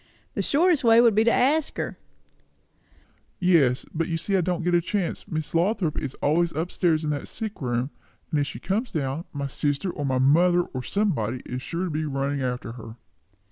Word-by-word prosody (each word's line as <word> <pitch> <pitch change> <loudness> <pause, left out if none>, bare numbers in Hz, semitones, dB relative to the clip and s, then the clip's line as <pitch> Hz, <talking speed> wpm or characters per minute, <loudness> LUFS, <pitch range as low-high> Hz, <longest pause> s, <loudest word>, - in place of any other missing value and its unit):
"The - - -1
shortest 330 0 +3
way 230 -1 +6
would 235 -2 +6
be 215 +2 +4
to 235 - +5
ask 285 +6 +2
her." - - -4 1.4
"Yes, 160 -9 +3
but 165 0 -1
you 165 - -1
see 195 +4 -1
I 190 - +3
can't 175 0 -1
get 175 +1 +1
a 175 - +4
chance. 185 0 -2
Miss 155 -1 -3
Lothrop 175 -2 +1
is 135 - -5
always 170 +3 +2
up 165 +4 -2
stairs 165 -3 +1
in 150 - -1
that 145 - -3
sick 220 -5 -6
room; 125 +1 -1 0.4
and 150 - +2
if 145 - 0
she 115 - -6
comes 205 - -2
down, 145 +1 -2
my 140 -1 -4
sister 145 +6 -1
or 145 - -5
my 130 -2 +1
mother 170 +7 +4
or 130 - -6
somebody 130 - -1
is 125 +1 -5
sure 170 +6 -3
to 180 - -2
be 155 +1 -1
running 140 -1 -1
after 125 -2 -3
her." 115 -1 -10
160 Hz, 205 wpm, -25 LUFS, 135-185 Hz, 1.4 s, way